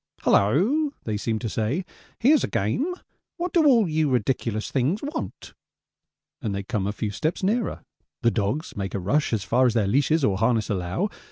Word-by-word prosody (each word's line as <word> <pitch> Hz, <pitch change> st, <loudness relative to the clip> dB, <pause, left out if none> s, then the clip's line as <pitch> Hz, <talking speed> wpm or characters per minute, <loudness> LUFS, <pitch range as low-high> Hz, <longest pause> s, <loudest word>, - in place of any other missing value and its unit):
'Hulloa,' 225 Hz, -, +3 dB
they 110 Hz, -, -2 dB
seem 110 Hz, +2 st, -1 dB
to 115 Hz, -, -4 dB
say, 115 Hz, -, -1 dB, 0.3 s
'here's 285 Hz, +4 st, +4 dB
a -, -, +1 dB
game 265 Hz, -, -1 dB, 0.4 s
what 355 Hz, 0 st, -3 dB
do 325 Hz, -4 st, +5 dB
all 235 Hz, -8 st, +5 dB
you 155 Hz, -2 st, +1 dB
ridiculous 115 Hz, -3 st, -1 dB
things 145 Hz, -, 0 dB
want?' 305 Hz, +3 st, -5 dB, 0.9 s
And 105 Hz, -5 st, -2 dB
they 100 Hz, -, -3 dB
come 100 Hz, -2 st, -2 dB
a -, -, 0 dB
few 105 Hz, 0 st, -3 dB
steps 155 Hz, -, -2 dB
nearer. 220 Hz, +4 st, 0 dB, 0.4 s
The 115 Hz, -, +4 dB
dogs 115 Hz, +9 st, -2 dB
make 95 Hz, -1 st, -4 dB
a -, -, -1 dB
rush 140 Hz, +12 st, +1 dB
as 110 Hz, -4 st, 0 dB
far 125 Hz, +7 st, +3 dB
as 120 Hz, -, 0 dB
their 110 Hz, -3 st, +3 dB
leashes 145 Hz, +8 st, +2 dB
or 95 Hz, -1 st, +1 dB
harness 115 Hz, -2 st, +1 dB
allow. 95 Hz, -, -1 dB
125 Hz, 185 wpm, -25 LUFS, -, 0.9 s, do